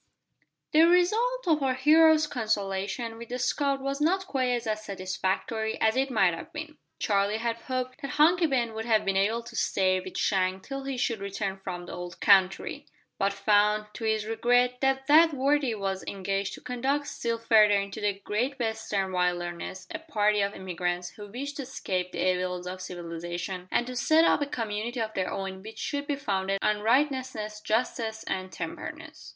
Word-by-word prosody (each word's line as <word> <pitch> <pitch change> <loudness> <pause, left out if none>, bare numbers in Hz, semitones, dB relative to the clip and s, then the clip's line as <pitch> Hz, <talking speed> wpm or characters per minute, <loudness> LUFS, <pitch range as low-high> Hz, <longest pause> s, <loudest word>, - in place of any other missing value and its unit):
The 320 +2 +6
result 435 +8 +2
of 310 -3 +3
our 265 -2 +1
hero's 310 +3 +6
consultation 220 -2 -2
with 235 - -9
the 250 - -3
scout 275 +2 0
was 275 +1 -3
not 375 +5 +2
quite 260 -6 0 0.2
as 215 -1 -2
satisfactory 195 +3 -2
as 220 0 +3
it 265 +1 +1
might 195 -8 +3
have 165 - -8
been. 310 -2 -7 0.2
Charlie 200 0 +1
had 230 0 -2
hoped 255 +3 -4
that 275 - -4
Hunky 335 +3 +5
Ben 240 -5 0
would 220 0 -4
have 220 -2 +2
been 195 0 +1
able 215 +4 +1
to 235 0 -11
stay 185 -4 +2
with 185 0 -7
Shank 185 -1 +1
till 275 -1 -6
he 270 -1 -3
should 235 -3 0
return 200 0 -3
from 180 -2 -5
the - - -9
old 175 -1 -7
country, 190 -2 +3 0.3
but 195 0 +2
found, 210 +1 +2
to - - -8
his 220 -1 +1
regret, 245 +3 +2
that 270 0 +1
that 310 +2 +6
worthy 275 -2 +2
was 195 -2 -3
engaged 195 0 -2
to - - -13
conduct 270 +4 -1
still 230 -4 -2
further 215 -3 +5
into 200 +2 -5
the 205 -1 0
great 250 +7 -1
western 220 -5 -2
wilderness 180 0 -2
a 315 - -4
party 210 -10 +1
of 200 +1 0
emigrants 180 -1 -3
who 205 -1 -10
wished 275 +7 -6
to - - -3
escape 185 -8 -3
the - - -1
evils 180 0 -3
of 185 +1 -6
civilisation, 175 +1 -5
and 240 - +1
to 255 0 -6
set 315 +6 +4
up - - +3
a 290 - 0
community 230 -1 -3
of 220 -1 -2
their 185 -1 -1
own 190 -1 -4
which 220 +3 -10
should 285 0 -3
be 290 - 0
founded 195 -7 -1
on 210 0 +2
righteousness, 250 -3 0
justice, 220 -1 -1
and 185 0 -3
temperance. - - -7
220 Hz, 185 wpm, -28 LUFS, 195-265 Hz, 0.3 s, The